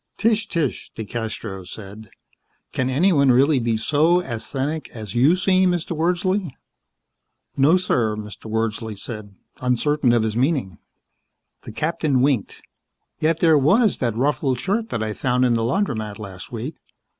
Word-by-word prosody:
"Tch, 225 -1 +1
tch," 160 -7 -2
DeCastros 110 -4 -5
said, 105 +2 -10 0.6
"can 130 0 -1
anyone 140 -1 +4
really 135 +3 +4
be 115 -2 0
so 155 +9 +3
asthenic 135 +3 -4
as 110 -3 -7
you 135 +8 +4
seem, 185 0 +3
Mr. 175 -1 -2
Wordsley?" 180 +3 0 1.1
"No, 145 +6 +5
sir," 120 -12 0
Mr. 105 0 -9
Wordsley 110 -1 -2
said, 105 -2 -7 0.2
uncertain 125 +2 +1
of 120 -2 +3
his 110 -1 -2
meaning. 125 - 0 0.9
The - - -7
captain 150 0 0
winked. 130 -6 0 0.6
"Yet 160 +1 +1
there 160 -3 +5
was 200 - +3
that 115 -3 -1
ruffled 135 -1 0
shirt 215 - -1
that 115 - -2
I 110 -1 -2
found 125 +2 +1
in 120 - +3
the 115 - +1
laundromat 115 - -1
last 95 -4 -9
week. 125 +7 -5
130 Hz, 145 wpm, -22 LUFS, 110-160 Hz, 1.1 s, No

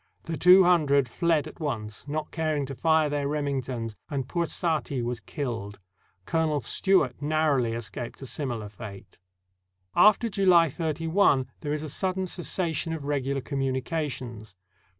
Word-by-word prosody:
The 165 - -4
two 180 +3 +7
hun 175 -4 +4
dred 140 -2 +3
fled 160 +3 +1
at 155 - -12
once, 110 -7 -4
not 150 +1 -3
caring 155 -3 -1
to 135 - -6
fire 160 +4 +3
their 145 -1 -1
Remingtons, 130 -6 -2
and 135 -4 -3
poor 170 +2 -1
Saati 155 -8 -1
was 120 0 -2
killed. 110 -6 -5 0.5
Colonel 160 -3 +1
Stewart 145 - +1
narrowly 145 -6 +1
escaped 115 +1 -5
a - - -5
similar 120 -6 -3
fate. 100 -3 -11 0.8
After 215 +2 +5
July 185 -6 +4
31, 160 -2 +2
there 145 - -4
is 150 0 -2
a - - -4
sudden 190 +4 -1
cessation 170 -2 -2
of 160 -3 -5
regular 140 -1 -1
communications. 130 - -3
145 Hz, 145 wpm, -27 LUFS, 125-165 Hz, 0.8 s, two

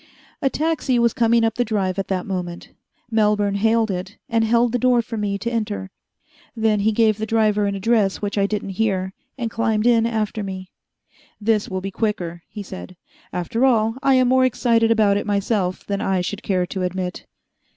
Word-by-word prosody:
A 270 - +2
taxi 305 -4 0
was 235 -1 +3
coming 235 0 +3
up 225 - +2
the 245 - 0
Drive 195 -4 -1
at 195 - -2
that 185 -2 -2
moment. 180 -3 -5 0.4
Melbourne 210 -2 +2
hailed 220 +1 +2
it, 185 +3 -5
and 230 -1 +1
held 235 +1 +3
the 245 - 0
door 245 -1 +3
for 230 - -6
me 205 -2 -1
to 235 +4 -3
enter. 210 -4 -3 0.6
Then 220 -2 +2
he 215 +2 +2
gave 220 -1 +2
the 220 - -2
driver 215 -2 +2
an 200 - -2
address 205 -1 +1
which 205 -1 -3
I 200 -1 +2
didn't 205 -1 -3
hear, 190 -3 0 0.2
and 235 -3 -3
climbed 225 -1 0
in 230 -1 +4
after 220 -2 -2
me. 190 -2 -6 0.7
"This 215 -1 +1
will 185 0 -3
be 195 +1 -5
quicker," 180 -5 -2
he 210 - -7
said. 185 -1 -9 0.3
"After 180 +7 -2
all, 225 -4 +3
I 275 -2 +4
am 255 -1 +4
more 260 +1 +4
excited 230 -2 +2
about 215 -3 +3
it 205 - -3
myself 200 -2 -1
than 200 -1 -2
I 190 -1 +1
should 205 +4 -4
care 185 -4 0
to 190 +1 -5
admit." 180 0 -3
215 Hz, 195 wpm, -21 LUFS, 195-230 Hz, 0.7 s, in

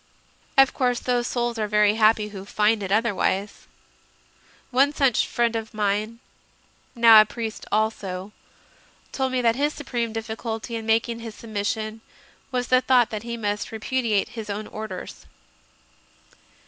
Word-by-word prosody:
Of 270 0 +6
course 245 -2 0
those 245 -1 0
souls 240 -1 -2
are 215 - 0
very 210 0 +3
happy 215 -1 +3
who 195 -2 -8
find 210 +2 +1
it 195 -1 -4
otherwise. 205 -2 0 1.0
One 275 +4 +3
such 270 -6 +2
friend 235 -1 0
of 220 -1 -5
mine, 210 +2 -1 0.8
now 230 -2 +8
a - - +2
priest 225 0 -6
also, 205 -3 -1 0.8
told 265 -1 -1
me 255 -1 0
that 230 -1 +3
his 290 +3 0
supreme 240 -5 -3
difficulty 225 +1 -5
in 225 -1 -5
mak 225 +1 +3
ing 230 -1 -5
his 225 -2 -8
submission 215 0 -4 0.5
was 250 -1 -2
the 255 0 +5
thought 250 -3 +3
that 215 -1 -4
he 235 +1 -5
must 210 -2 -3
repudiate 220 -2 -1
his 220 -2 -8
own 205 +1 -4
Orders. 215 -4 -8
225 Hz, 145 wpm, -24 LUFS, 210-240 Hz, 1.0 s, now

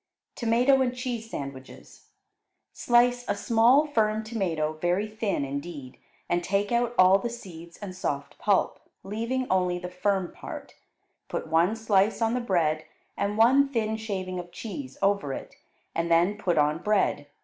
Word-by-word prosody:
Tomato 245 +3 +3
and 250 -1 0
Cheese 245 -3 -4
Sandwiches 135 -7 -9 0.7
Slice 245 0 +3
a - - 0
small, 230 +7 +4
firm 220 -6 +1
tomato 175 -9 -1
very 180 +4 +1
thin 215 -8 -2
indeed, 140 -1 -7 0.3
and 175 0 0
take 200 +3 0
out 240 0 +1
all 185 +1 +6
the 240 - -3
seeds 170 -7 -10
and 195 -3 -8
soft 140 -6 -4
pulp, 200 -3 +1 0.2
leaving 230 +6 -2
only 180 -1 +2
the 180 0 -7
firm 190 0 0
part; - - -9 0.5
put - - -4
one 170 +6 +2
slice 215 -2 +2
on 225 0 +1
the 250 - 0
bread, 160 -8 +1 0.3
and 205 +1 -2
one 265 +5 +5
thin 220 -4 -1
shaving 190 -4 -4
of 175 0 -8
cheese 260 +8 -7
over 195 -9 +1
it, - - -8 0.4
and 170 +1 -1
then 175 +5 +4
put 180 -5 -1
on 150 +1 +2
bread. 190 -7 +1
200 Hz, 155 wpm, -27 LUFS, 175-230 Hz, 0.7 s, all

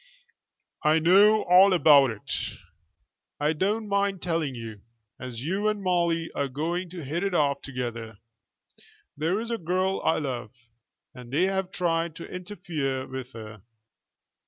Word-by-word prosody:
"I 155 0 +4
know 200 +6 +5
all 185 +2 +6
about 145 -6 +6
it." 110 -3 -8 1.1
"I 150 +2 +1
don't 210 +7 -1
mind 200 -1 0
telling 165 -6 -1
you, 110 -3 -8 0.4
as 125 -2 -7
you 195 +7 -1
and 210 -2 -1
Molly 170 -2 0
are 140 - -1
going 170 +7 -3
to 170 -4 -8
hit 165 +7 -2
it 195 -2 -1
off 140 -3 +1
together. 120 -4 -5 1.0
There 165 +7 0
is 230 +1 -5
a 230 - -2
girl 185 +3 0
I 160 - +2
love, 125 -7 -4 0.6
and 125 -1 -12
they 155 +6 +2
have 190 -1 0
tried 165 -3 -1
to 170 - -8
interfere 160 -8 -4
with 130 -1 -7
her." 110 -2 -10
165 Hz, 145 wpm, -26 LUFS, 130-185 Hz, 1.1 s, all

